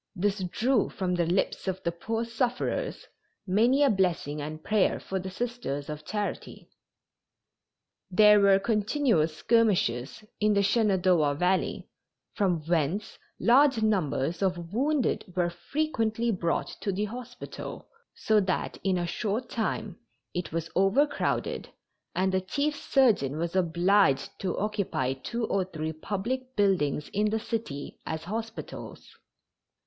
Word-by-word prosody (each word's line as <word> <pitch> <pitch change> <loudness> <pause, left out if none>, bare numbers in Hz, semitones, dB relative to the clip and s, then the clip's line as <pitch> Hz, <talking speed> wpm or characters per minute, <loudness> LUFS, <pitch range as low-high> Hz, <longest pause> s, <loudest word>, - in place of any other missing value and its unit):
This 200 +2 0
drew 235 +6 +1
from 185 -2 -2
the 175 -2 +1
lips 185 +2 0
of 190 0 -2
the 170 - 0
poor 225 +7 -3
sufferers 245 - -2 0.4
many 235 +9 +3
a 280 - +5
blessing 175 -7 0
and 155 +2 -6
prayer 215 -3 +2
for 190 - -3
the 185 +1 -5
Sisters 190 - -4
of 150 0 -6
Charity. 205 +4 -5 1.4
There 210 +2 +7
were 200 -1 +6
continual 215 - +2
skirmishes 175 - +1 0.2
in 210 0 +3
the 200 - +3
Shenandoah 185 -8 +3
Valley, 180 +4 0 0.5
from 185 -6 +1
whence 170 +4 -1 0.2
large 255 -1 +5
numbers 170 -6 0
of 180 -2 -1
wounded 275 +2 +1
were 175 -1 +1
frequently 230 - -1
brought 175 -4 -1
to 200 - -1
the 200 +3 -1
hospital, 245 +3 -8 0.3
so 215 -1 +3
that 190 -2 -1
in 190 -2 +2
a 175 - -1
short 215 +7 -2
time 215 -4 -2 0.3
it 175 -1 -3
was 165 0 -3
overcrowded 215 +11 +1 0.5
and 190 +1 +2
the 190 0 +1
chief 285 +11 -1
surgeon 220 - +2
was 170 +2 -2
obliged 175 -4 +3
to 185 -2 -2
occupy 200 - -1
two 230 - -3
or 195 -3 +1
three 160 -3 -4
public 235 +10 -4
buildings 175 -8 +1
in 210 +1 +1
the 220 +1 0
city 215 -11 -5
as 160 0 -3
hospitals. 225 +5 -6
195 Hz, 135 wpm, -28 LUFS, 170-225 Hz, 1.4 s, There